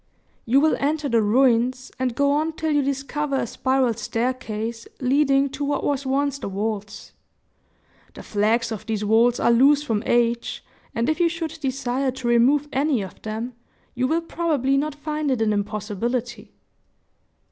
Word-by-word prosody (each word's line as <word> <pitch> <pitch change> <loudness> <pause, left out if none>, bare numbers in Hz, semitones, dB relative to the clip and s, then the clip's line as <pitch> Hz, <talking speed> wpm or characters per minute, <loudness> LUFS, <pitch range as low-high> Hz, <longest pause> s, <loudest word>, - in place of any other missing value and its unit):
"You 260 +4 +5
will 310 +2 +3
enter 295 +1 0
the 235 -4 +3
ruins, 250 +3 +2
and 255 -2 -1
go 280 +1 +2
on 310 +3 0
till 315 0 -2
you 290 -1 +3
discover 275 +1 -2
a 265 - 0
spiral 260 0 +1
staircase 230 0 -3
leading 275 +1 +3
to 280 +2 -5
what 285 0 -1
was 280 -1 -1
once 280 +1 0
the - - -5
vaults. 205 +1 -4 1.0
The - - -9
flags 225 +3 +1
of 220 0 -6
these 215 -2 -2
vaults 230 +3 +3
are - - +3
loose 280 +5 +5
from 225 -8 -1
age, 235 0 0 0.3
and 230 +1 0
if 310 0 0
you 345 -1 +4
should 325 -1 -5
desire 265 -1 -1
to 255 -2 -5
remove 255 +5 +3
any 275 -5 +1
of 190 - -11
them, 220 +3 -5 0.4
you 250 +1 0
will 325 +4 +1
probably 310 -6 0
not 290 +1 -1
find 300 0 -3
it 260 -3 +1
an 220 -1 +2
impossibility." 215 +4 -3
260 Hz, 165 wpm, -23 LUFS, 230-285 Hz, 1.0 s, You